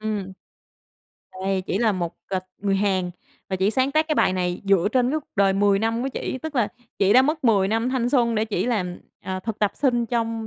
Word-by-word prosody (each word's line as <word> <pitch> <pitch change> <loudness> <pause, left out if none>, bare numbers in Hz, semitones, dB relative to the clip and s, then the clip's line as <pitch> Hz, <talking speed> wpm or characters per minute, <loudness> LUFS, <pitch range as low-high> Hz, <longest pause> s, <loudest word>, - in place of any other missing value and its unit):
Ừm. 210 -3 -3 1.1
Đây, 190 -1 0
chỉ 190 - -1
là 225 -2 +3
một, 175 -3 -3
à, 190 -1 -1 0.2
người 195 -1 0
Hàn 190 -3 0 0.4
và 190 - -1
chị 190 +2 +2
sáng 260 +3 +1
tác 310 +1 +2
cái 305 - +2
bài 185 - +3
này 180 -1 -1
dựa 195 -1 +3
trên 250 -1 +2
cái 310 +2 0
cuộc - - -29
đời 195 -1 +4
10 200 0 +3
năm 225 +2 0
của 265 - -1
chỉ, 260 - -4
tức 310 +2 -6
là 235 -5 +2 0.3
chị 195 0 +4
đã 255 +3 +7
mất 305 +2 -1
10 200 -5 +4
năm 225 +3 0
thanh 255 -2 0
xuân 240 -3 +2
để 215 0 +1
chỉ 210 -2 -2
làm, 185 -7 -2 0.2
à, 185 0 -4
thực 220 +2 -5
tập 210 -2 +2
sinh 240 -4 +1
trong 230 -1 -2
215 Hz, 235 wpm, -23 LUFS, 195-245 Hz, 1.1 s, đã